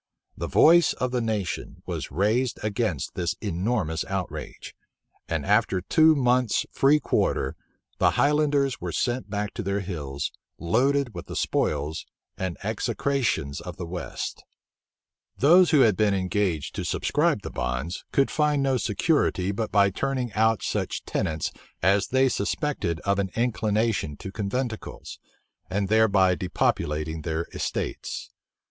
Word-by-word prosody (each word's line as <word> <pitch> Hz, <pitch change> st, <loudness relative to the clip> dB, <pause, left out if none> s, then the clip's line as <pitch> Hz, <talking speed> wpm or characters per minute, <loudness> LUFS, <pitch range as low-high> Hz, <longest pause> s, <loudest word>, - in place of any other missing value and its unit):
The -, -, -4 dB
voice 170 Hz, +1 st, +6 dB
of 125 Hz, -1 st, -2 dB
the 125 Hz, -1 st, 0 dB
nation 110 Hz, -5 st, -3 dB
was -, -, -4 dB
raised 110 Hz, -, +1 dB
against 105 Hz, -, -1 dB
this 90 Hz, 0 st, -1 dB
enormous 95 Hz, -3 st, -1 dB
outrage; 95 Hz, -2 st, -5 dB, 0.6 s
and -, -, -1 dB
after 95 Hz, -, +2 dB
two 155 Hz, -, +4 dB
months' 125 Hz, -3 st, +2 dB
free 145 Hz, +3 st, +4 dB
quarter, -, -, 0 dB, 0.4 s
the -, -, +5 dB
highlanders 145 Hz, -2 st, +2 dB
were -, -, -3 dB
sent 120 Hz, -3 st, -1 dB
back 105 Hz, 0 st, -3 dB
to -, -, -4 dB
their 100 Hz, +1 st, -1 dB
hills, 75 Hz, -7 st, -4 dB, 0.3 s
loaded 125 Hz, -, +1 dB
with 85 Hz, -, -8 dB
the -, -, -7 dB
spoils 75 Hz, +2 st, -1 dB, 0.3 s
and 95 Hz, -2 st, -3 dB
execrations 110 Hz, -, -1 dB
of -, -, -8 dB
the 90 Hz, -, -5 dB
west. 85 Hz, 0 st, -5 dB, 0.9 s
Those 175 Hz, +6 st, +6 dB
who 150 Hz, -4 st, +5 dB
had 110 Hz, -6 st, +5 dB
been 105 Hz, -2 st, +3 dB
engaged 95 Hz, -4 st, -1 dB
to -, -, -2 dB
subscribe -, -, +1 dB
the -, -, -6 dB
bonds, 60 Hz, +8 st, -3 dB
could 135 Hz, -, +2 dB
find 150 Hz, -2 st, +2 dB
no 135 Hz, -1 st, +2 dB
security 105 Hz, -, +1 dB
but 110 Hz, +2 st, -3 dB
by 100 Hz, -1 st, +4 dB
turning 130 Hz, +1 st, -2 dB
out 110 Hz, 0 st, +2 dB
such -, -, -2 dB
tenants 80 Hz, -1 st, -2 dB, 0.3 s
as 100 Hz, +2 st, +3 dB
they 130 Hz, +1 st, +3 dB
suspected 100 Hz, -, -1 dB
of 100 Hz, 0 st, 0 dB
an 95 Hz, -1 st, 0 dB
inclination 110 Hz, -, 0 dB
to 95 Hz, -, -7 dB
conventicles, 110 Hz, +3 st, -4 dB, 0.5 s
and 100 Hz, +1 st, -1 dB
thereby 100 Hz, -4 st, +4 dB
depopulating 80 Hz, -3 st, -1 dB
their 80 Hz, +1 st, -2 dB
estates. -, -, -4 dB
105 Hz, 140 wpm, -26 LUFS, 90-125 Hz, 0.9 s, voice